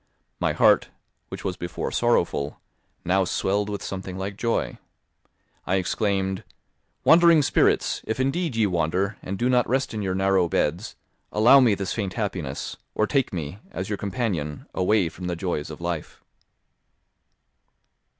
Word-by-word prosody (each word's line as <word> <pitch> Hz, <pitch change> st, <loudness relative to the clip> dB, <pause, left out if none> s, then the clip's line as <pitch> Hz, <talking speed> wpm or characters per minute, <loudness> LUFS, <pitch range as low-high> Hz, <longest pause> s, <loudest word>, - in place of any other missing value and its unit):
My -, -, +1 dB
heart, -, -, +4 dB, 0.4 s
which -, -, -7 dB
was 90 Hz, -2 st, -3 dB
before 85 Hz, 0 st, -4 dB
sorrowful, 70 Hz, 0 st, +1 dB, 0.5 s
now 95 Hz, +2 st, +3 dB
swelled 100 Hz, +3 st, 0 dB
with 100 Hz, -2 st, -4 dB
something 95 Hz, -1 st, -5 dB
like 95 Hz, +1 st, -4 dB
joy; 115 Hz, +2 st, -1 dB, 0.9 s
I 90 Hz, -, +2 dB
exclaimed, 95 Hz, 0 st, 0 dB, 0.6 s
"Wandering 170 Hz, -2 st, +6 dB
spirits, -, -, +2 dB
if 110 Hz, -, -3 dB
indeed 135 Hz, +2 st, 0 dB
ye 110 Hz, -1 st, +3 dB
wander, 90 Hz, +3 st, 0 dB
and 95 Hz, +1 st, -4 dB
do 120 Hz, -, +1 dB
not 125 Hz, -1 st, +2 dB
rest 130 Hz, +1 st, 0 dB
in 110 Hz, -, -3 dB
your 95 Hz, -2 st, -1 dB
narrow 95 Hz, -2 st, +2 dB
beds, 85 Hz, +8 st, -1 dB, 0.4 s
allow 120 Hz, +6 st, +7 dB
me 120 Hz, -6 st, +4 dB
this 100 Hz, -1 st, -3 dB
faint 100 Hz, -5 st, -3 dB
happiness, 90 Hz, -, -4 dB, 0.2 s
or 110 Hz, -, +2 dB
take 135 Hz, +3 st, +1 dB
me, 85 Hz, +1 st, -5 dB
as 95 Hz, +2 st, -5 dB
your 100 Hz, -, -1 dB
companion, 95 Hz, -, -3 dB
away 95 Hz, 0 st, +2 dB
from 90 Hz, +2 st, -7 dB
the 90 Hz, -, -2 dB
joys 85 Hz, -4 st, -3 dB
of 75 Hz, -, -8 dB
life." 85 Hz, -2 st, -5 dB
95 Hz, 150 wpm, -25 LUFS, 90-110 Hz, 0.9 s, allow